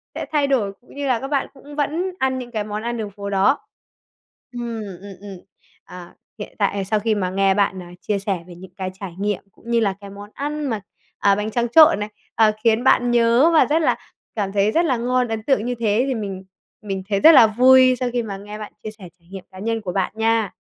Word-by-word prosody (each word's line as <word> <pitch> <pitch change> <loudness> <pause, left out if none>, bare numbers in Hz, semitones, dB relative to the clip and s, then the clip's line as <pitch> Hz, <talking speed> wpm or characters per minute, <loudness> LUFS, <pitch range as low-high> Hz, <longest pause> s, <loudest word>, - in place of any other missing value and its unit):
sẽ - - -4
thay 295 -2 +2
đổi, 240 -8 +1
cũng 250 - -19
như 285 0 -3
là 250 -3 +1
các 270 - -5
bạn 280 -1 -1
cũng 285 +1 -13
vẫn 315 +6 -1
ăn 260 0 0
những 245 -1 -8
cái 215 -3 -2
món 210 0 -5
ăn 235 0 -3
đường 215 -2 -5
phố 200 +1 -7
đó. 200 +8 +2 0.9
Ừm, 235 -2 -5 0.2
ừm, 200 0 -10
ừm, 200 -2 -9 0.5
ờ, 180 -1 -11 0.3
hiện 205 - -8
tại 200 -1 0
sau 215 +2 0
khi 220 +1 0
mà 190 -3 -1
nghe 195 +1 +2
bạn, 190 -2 0
à, 175 - -13
chia 205 -2 -1
sẻ 195 -2 -2
về 175 - -11
những 180 +1 -14
cái 190 -1 -3
trải 190 -4 -7
nghiệm 205 -1 -2
cũng 230 - -15
như 235 - +3
là 205 -4 +1
cái 200 - -10
món 200 +1 -11
ăn 295 +1 -4
mà, 225 -6 -2 0.4
à, 200 -1 +4
bánh 210 +2 -3
tráng 240 +1 -1
trộn 310 -3 +7
này, 210 0 -4 0.3
ờ, 220 -1 +5
khiến 230 +1 +3
bạn 245 -2 +3
nhớ 240 +5 +4
và 320 - +6
rất 310 +2 +1
là - - +2 0.4
cảm 200 -3 -2
thấy 200 +1 +2
rất 335 +8 +2
là 260 -6 +1
ngon, 250 +1 0
ấn 225 -1 -4
tượng 230 -4 +1
như 245 0 -2
thế 220 +1 +2
thì 265 - -1
mình 195 -4 -5 0.4
mình 195 -2 -4
thấy 200 -2 +1
rất 320 - +8
là 250 -8 +8
vui 255 +3 +5
sau 250 - -1
khi 240 -1 0
mà 200 -3 -6
nghe 210 +2 -9
bạn 210 - -8
chia 215 - -5
sẻ 205 -5 -13
trải 170 - -29
nghiệm 195 -2 -8
cá 185 - -12
nhân 225 +2 -2
của 190 -4 -4
bạn 190 0 0
nha. 225 -2 +1
220 Hz, 250 wpm, -21 LUFS, 200-250 Hz, 0.9 s, rất